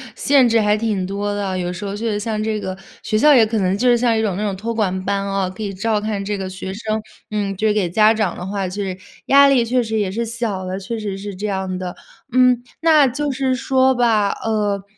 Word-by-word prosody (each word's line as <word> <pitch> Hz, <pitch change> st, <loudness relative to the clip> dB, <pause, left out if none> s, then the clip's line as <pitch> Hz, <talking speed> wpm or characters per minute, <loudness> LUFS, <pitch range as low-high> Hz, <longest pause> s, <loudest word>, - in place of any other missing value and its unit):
限 275 Hz, -3 st, +4 dB
制 230 Hz, 0 st, +3 dB
还 210 Hz, -1 st, +3 dB
挺 210 Hz, -4 st, -1 dB
多 200 Hz, +2 st, -3 dB
的 205 Hz, 0 st, -2 dB
啊。 190 Hz, -1 st, -2 dB
有 180 Hz, -1 st, -2 dB
时 180 Hz, +3 st, -6 dB
候 200 Hz, 0 st, -4 dB
确 225 Hz, +2 st, -2 dB
实 205 Hz, -, -1 dB
像 215 Hz, 0 st, -2 dB
这 215 Hz, -1 st, -1 dB
个 190 Hz, -2 st, -5 dB, 0.3 s
学 215 Hz, -, 0 dB
校 295 Hz, +7 st, +6 dB
也 240 Hz, -5 st, +6 dB
可 220 Hz, 0 st, -1 dB
能 190 Hz, 0 st, +1 dB
就 250 Hz, -, +1 dB
是 245 Hz, -, +6 dB
像 235 Hz, -1 st, +2 dB
一 -, -, +1 dB
种 205 Hz, -4 st, -1 dB
那 205 Hz, -, -3 dB
种 200 Hz, -2 st, -1 dB
托 230 Hz, +4 st, -3 dB
管 190 Hz, -4 st, -1 dB
班 200 Hz, 0 st, -1 dB
啊， 195 Hz, -1 st, -1 dB
可 185 Hz, +4 st, -7 dB
以 200 Hz, -1 st, -4 dB
照 210 Hz, +2 st, -1 dB
看 210 Hz, -2 st, -3 dB
这 205 Hz, 0 st, -2 dB
个 190 Hz, -1 st, -4 dB
学 190 Hz, 0 st, -6 dB
生。 215 Hz, +1 st, -3 dB, 0.3 s
嗯， 205 Hz, -2 st, -2 dB
就 215 Hz, +3 st, 0 dB
是 210 Hz, -, +3 dB
给 200 Hz, -4 st, 0 dB
家 215 Hz, +5 st, +4 dB
长 215 Hz, -5 st, -1 dB
的 180 Hz, -, -6 dB
话， 195 Hz, 0 st, -2 dB
就 200 Hz, +3 st, -4 dB
是， 185 Hz, -2 st, -4 dB, 0.3 s
压 280 Hz, 0 st, +7 dB
力 270 Hz, -3 st, +4 dB
确 245 Hz, +2 st, +1 dB
实 220 Hz, -1 st, -2 dB
也 200 Hz, -3 st, -1 dB
是 230 Hz, +4 st, -2 dB
小 225 Hz, -5 st, -3 dB
的， 185 Hz, +1 st, -4 dB
确 230 Hz, +3 st, -5 dB
实 205 Hz, -3 st, -4 dB
是 200 Hz, +1 st, -6 dB
这 205 Hz, +3 st, -4 dB
样 190 Hz, -2 st, -2 dB
的， 180 Hz, -1 st, -5 dB, 0.4 s
嗯。 250 Hz, -1 st, +4 dB, 0.2 s
那 310 Hz, -4 st, +5 dB
就 285 Hz, +3 st, -2 dB
是 260 Hz, -1 st, 0 dB
说 260 Hz, 0 st, +2 dB
吧， 225 Hz, -4 st, +2 dB
呃， 205 Hz, -3 st, -1 dB
210 Hz, 280 characters per minute, -20 LUFS, 195-230 Hz, 0.4 s, 压